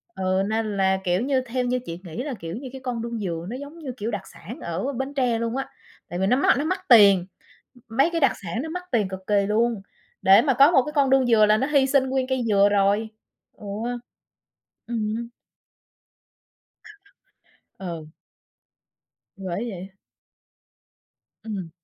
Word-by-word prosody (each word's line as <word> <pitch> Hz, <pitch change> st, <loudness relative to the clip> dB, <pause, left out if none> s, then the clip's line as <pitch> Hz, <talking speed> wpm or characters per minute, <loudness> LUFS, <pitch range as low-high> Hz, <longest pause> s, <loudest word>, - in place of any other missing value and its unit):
ừ, 190 Hz, +1 st, 0 dB
nên 220 Hz, -2 st, -1 dB
là, 190 Hz, 0 st, +2 dB
kiểu 180 Hz, +2 st, +1 dB
như, 265 Hz, 0 st, +1 dB
theo 255 Hz, 0 st, -2 dB
như 250 Hz, +1 st, 0 dB
chị 165 Hz, +1 st, -6 dB
nghĩ 185 Hz, +9 st, -6 dB
là, 290 Hz, -3 st, -4 dB
kiểu 165 Hz, +3 st, -6 dB
như, 260 Hz, +1 st, -7 dB
cái 265 Hz, -, -8 dB
con 245 Hz, -3 st, -3 dB
đuông 235 Hz, -1 st, -4 dB
dừa 170 Hz, -4 st, -4 dB
nó 245 Hz, -, -4 dB
giống 285 Hz, +4 st, -10 dB
như, 275 Hz, -5 st, -5 dB
kiểu, 220 Hz, +2 st, -3 dB
đặc 205 Hz, -2 st, -3 dB
sản 225 Hz, +9 st, -10 dB
ở 180 Hz, +11 st, -3 dB
Bến 265 Hz, +3 st, -4 dB
Tre 245 Hz, -4 st, +1 dB
luôn 230 Hz, +2 st, -2 dB
á. 270 Hz, -, -4 dB, 0.4 s
Tại 175 Hz, -, -4 dB
vì 190 Hz, -, +1 dB
nó 250 Hz, -, +4 dB
mắc 275 Hz, -, +3 dB
nó 285 Hz, -, 0 dB
mắc 370 Hz, +2 st, -2 dB
tiền, 200 Hz, -6 st, +7 dB, 0.6 s
mấy 270 Hz, +9 st, +3 dB
cái 330 Hz, -2 st, -1 dB
đặc 275 Hz, -, +5 dB
sản 180 Hz, +8 st, -3 dB
nó 320 Hz, -, -5 dB
mắc 360 Hz, +2 st, -5 dB
tiền 215 Hz, -5 st, +2 dB
cực 190 Hz, 0 st, -6 dB
kỳ 200 Hz, -1 st, +2 dB
luôn. 225 Hz, 0 st, +1 dB, 0.4 s
Để 195 Hz, +3 st, +7 dB
mà 270 Hz, +1 st, +2 dB
có 275 Hz, +6 st, +6 dB
một 265 Hz, -, +5 dB
cái 300 Hz, -, -6 dB
con 280 Hz, -3 st, +3 dB
đuông 265 Hz, -2 st, +4 dB
dừa 220 Hz, -2 st, +5 dB
là 215 Hz, +1 st, +4 dB
nó 265 Hz, -, 0 dB
hi 280 Hz, -3 st, +3 dB
sinh 265 Hz, -1 st, +2 dB
nguyên 260 Hz, -1 st, 0 dB
cây 260 Hz, -2 st, -1 dB
dừa 200 Hz, -1 st, +4 dB
rồi. 205 Hz, +2 st, +2 dB, 0.5 s
Ừ. 210 Hz, -, -12 dB, 1.2 s
Ừm. 225 Hz, 0 st, -2 dB, 2.5 s
Ừ. 170 Hz, -5 st, -6 dB, 1.3 s
Thì 195 Hz, -, -11 dB
bởi 190 Hz, +7 st, -3 dB
vậy. 190 Hz, -1 st, -7 dB, 1.6 s
Ừm. 195 Hz, -6 st, -5 dB
230 Hz, 185 wpm, -24 LUFS, 195-265 Hz, 2.5 s, tiền